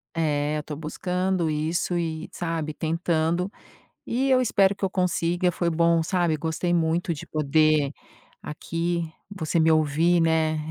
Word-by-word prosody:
É, 150 -2 0
eu 150 - -4
tô 150 - -6
buscando 180 +3 -1
isso 160 +3 -1
e, 160 -2 -3
sabe, 165 -3 -3
tentando. 165 +3 -1 0.6
E 265 +3 0
eu 260 -1 +5
espero 200 -5 +3
que 195 - -4
eu 190 - 0
consiga. 180 -1 +1
Foi 170 0 -1
bom, 170 0 +3
sabe, 170 -2 +1
gostei 160 +3 -2
muito 165 +1 +1
de 165 +3 -9
poder 155 -1 +2 0.5
aqui, 165 +2 -3 0.2
você 170 -4 -1
me 160 0 +4
ouvir, 160 +3 +3
né, 160 -1 +2
165 Hz, 145 wpm, -25 LUFS, 155-175 Hz, 0.6 s, eu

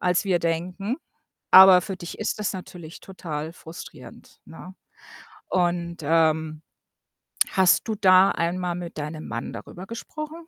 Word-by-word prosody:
als 180 +2 +1
wir 185 -3 +1
denken. 180 - -3 0.5
Aber 190 -1 +9
für 195 -1 -6
dich 175 -1 -9
ist 215 0 -3
das 210 - -2
natürlich 175 -3 -10
total 160 -4 -6
frustrierend, 165 -1 -13
ne? 180 +3 -12 0.7
Und, 175 -1 -1
ähm, 160 0 +1 0.9
hast 190 +3 +3
du 220 - -2
da 190 -1 +5
einmal 175 +1 -2
mit 175 -2 -8
deinem 155 +1 -6
Mann 115 - -5
darüber 185 +2 -9
gesprochen? 305 +8 -8
180 Hz, 130 wpm, -24 LUFS, 165-190 Hz, 0.9 s, Aber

